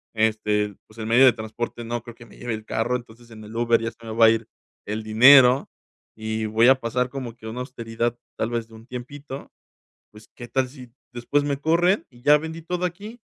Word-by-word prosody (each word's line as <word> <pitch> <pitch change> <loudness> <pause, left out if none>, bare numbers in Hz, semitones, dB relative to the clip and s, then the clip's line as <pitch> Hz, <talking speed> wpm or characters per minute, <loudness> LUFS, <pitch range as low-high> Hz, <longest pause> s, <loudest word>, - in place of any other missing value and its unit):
Este, 105 -2 +1
pues 110 - -20
el 110 - -4
medio 125 +4 +6
de 125 - +7
transporte, 120 +1 -5
no 120 0 -3
creo 120 -1 -11
que 120 0 -14
me - - -17
lleve 120 -2 -4
el 110 0 -10
carro. 115 +3 -1
Entonces 120 -1 -9
en 110 -1 -11
el 105 +2 -11
Uber 115 0 +2
ya 115 0 -3
se 115 0 -23
me 110 - -6
va 115 0 +6
a - - +8
ir 115 0 -2 0.4
el 110 +1 -3
dinero 125 +4 +7 0.5
y 110 0 -3
voy 110 +3 +4
a 130 0 +5
pasar 125 +1 -1
como 125 -4 -6
que 110 - -15
a - - -4
una 125 - -6
austeridad, 120 -2 -3 0.2
tal 110 - -1
vez 115 -1 -2
de 115 - -19
un 110 +2 -15
tiempito. 135 +3 -8 0.6
Pues, 105 0 -16
¿qué 120 -1 -9
tal 130 0 0
si, 125 -3 -13 0.2
después 125 +4 0
me 140 -1 -1
corren? 175 +6 +2
Y 120 0 -19
ya 150 +1 +6
vendí 160 +2 -7
todo 180 +2 -2
aquí 205 +7 -7
120 Hz, 230 wpm, -24 LUFS, 110-130 Hz, 0.6 s, a